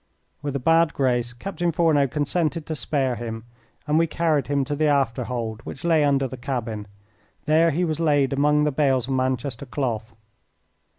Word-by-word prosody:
With 145 -2 -4
a - - 0
bad 165 +3 +3
grace 125 -3 +1
Captain 175 +7 -3
Fourneau 160 -4 +3
consented 155 +3 -1
to 160 - -4
spare 135 -4 -1
him, 115 -1 -5 0.4
and 155 +1 +2
we 165 - +3
carried 160 -3 0
him 140 -1 0
to 145 +2 -2
the 155 +1 +1
after 135 -4 +1
hold, 115 -2 -4
which 135 - -9
lay 165 -3 +3
under 140 -2 +2
the 130 - -8
cabin. 115 -5 -4 0.6
There 160 +2 +4
he 170 +4 0
was 160 -1 -2
laid 145 -4 +2
among 150 +2 +3
the 150 - +2
bales 135 -3 +1
of 135 - -2
Manchester 130 0 -2
cloth. 115 -4 -3
140 Hz, 180 wpm, -24 LUFS, 125-155 Hz, 0.6 s, There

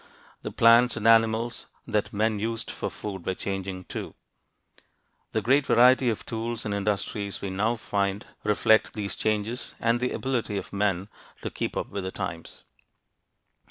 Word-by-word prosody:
The - - -4
plants 115 +2 +5
and 110 - 0
animals 115 +1 +3 0.2
that 105 -1 -1
men 110 +1 +1
used 115 +1 -3
for - - -4
food 95 -4 -6
were 95 - -2
changing, 95 -1 -4
too. - - -6 1.2
The - - -1
great 135 +3 +3
variety 125 +1 +6
of 110 - -3
tools 115 0 -3
and 105 - -1
industries 100 0 -2
we 100 - -4
now 105 +5 +1
find 100 -2 -1 0.2
reflect 110 +1 +3
these 100 -2 -3
changes 110 +3 -2
and 115 +1 +2
the 125 +1 0
ability 120 -6 -1
of 100 - -6
men 100 -2 0 0.4
to - - -3
keep - - -3
up - - -2
with 100 -1 -4
the 95 - -3
times. - - -6
110 Hz, 160 wpm, -27 LUFS, 100-115 Hz, 1.2 s, variety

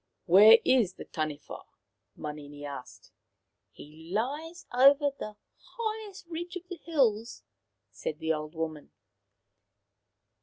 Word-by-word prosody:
" - - -52
Where 210 +6 +9
is 235 -8 +3
the - - -9
Taniwha? 155 -2 -5 0.3
" - - -53
Manini 145 -1 -8
asked. 140 -3 -9 0.3
" - - -54
He 155 +3 -13
lies 295 - -3
over 280 +3 +6
the 215 0 -6 0.4
highest 435 -4 -4
ridge 345 +2 -6
of 360 0 -7
the 360 - -7
hills/' 235 -8 +1 0.5
said 485 -1 -5
the 160 0 0
old 155 +1 -6
woman. 160 -2 -4
220 Hz, 125 wpm, -29 LUFS, -, 0.5 s, Where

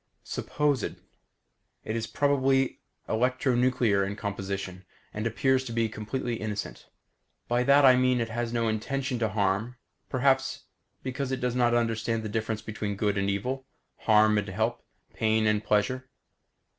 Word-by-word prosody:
Supposed: 145 -5 -1 1.0
It 110 - -3
is 115 -1 -2
probably 135 +1 +2 0.3
electronuclear 125 -3 +2
in 100 +1 -3
composition, 95 -2 -4 0.3
and 105 +2 -2
appears 130 +3 +2
to 120 - -6
be 115 -1 +1
completely 115 +3 -3
innocent. 105 -2 -5 0.6
By 120 +1 +2
that 140 +1 +6
I 130 -1 +8
mean 125 0 +3
it 115 -1 -1
has 120 0 -2
no 115 -1 0
intention 130 +4 -2
to 110 -2 +1
harm, 105 +3 0 0.3
perhaps 135 0 +1 0.4
because 130 +1 -3
it 130 - -1
does 125 -1 -1
not 120 -1 +3
understand 115 -1 0
the 110 - -4
difference 110 0 -2
between 105 -1 -4
good 100 0 0
and 100 0 0
evil, 130 +7 -2 0.3
harm 105 -1 +4
and 105 - -4
help, 110 +5 -1 0.3
pain 110 0 +2
and 105 0 +2
pleasure. 130 +5 0
115 Hz, 145 wpm, -28 LUFS, 105-130 Hz, 1.0 s, I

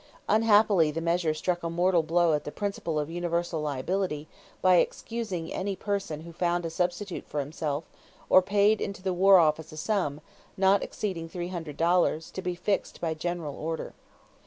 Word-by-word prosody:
Unhappily 210 -6 +4
the 155 +2 -3
measure 170 0 +1
struck 175 +3 -1
a 165 - -3
mortal 175 +1 +3
blow 165 +1 +2
at 150 -1 0
the 150 - -6
principle 195 -5 -3
of 150 -1 -1
universal 170 -1 -1
liability 150 +2 -2 0.3
by 185 -1 +5
excusing 195 -6 -2
any 195 +1 -2
person 195 -7 -3
who 170 +1 -10
found 175 0 0
a 165 - -3
substitute 180 +2 -2
for 150 - -3
himself 145 +1 -3 0.4
or 185 - +7
paid 205 +3 +3
into 200 -1 -4
the 190 -1 0
war 190 +2 +6
office 160 -2 +2
a 155 - -10
sum, 160 -5 -1 0.4
not 195 +1 +4
exceeding 170 -6 -4
three 175 +1 -5
hundred 165 -5 -6
dollars, 165 -1 +2
to 190 - -5
be 180 -1 -2
fixed 195 +3 -2
by 165 -2 -1
general 160 -2 -4
order. 160 +1 -4
175 Hz, 175 wpm, -28 LUFS, 160-190 Hz, 0.4 s, or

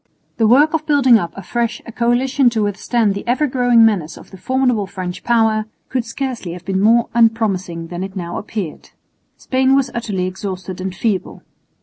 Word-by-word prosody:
The 225 - +3
work 285 +7 +5
of 315 -1 -2
building 265 -6 +5
up 170 -4 -4
afresh 235 +4 -2
a - - -8
coalition 245 +3 +2
to 225 -2 -1
withstand 205 +1 0
the 200 - -5
ever 260 +5 +2
growing 245 -4 +4
menace 180 -8 0
of - - -15
the 190 - -11
formidable 250 -5 0
French 185 -2 -6
power 220 -2 +2 0.2
could 255 -3 -1
scarcely 235 -7 -4
have 175 0 -10
been 190 -1 -1
more 230 +3 +4
unpromising 200 -8 +1
than 175 +1 -5
it 195 0 -7
now 175 -2 -4
appeared. 205 -7 -6 0.5
Spain 260 +1 +2
was 270 -2 +1
utterly 205 -6 -2
exhausted 185 -1 -6
and 185 0 -4
feeble. 205 -3 -2
225 Hz, 180 wpm, -18 LUFS, 190-245 Hz, 0.5 s, work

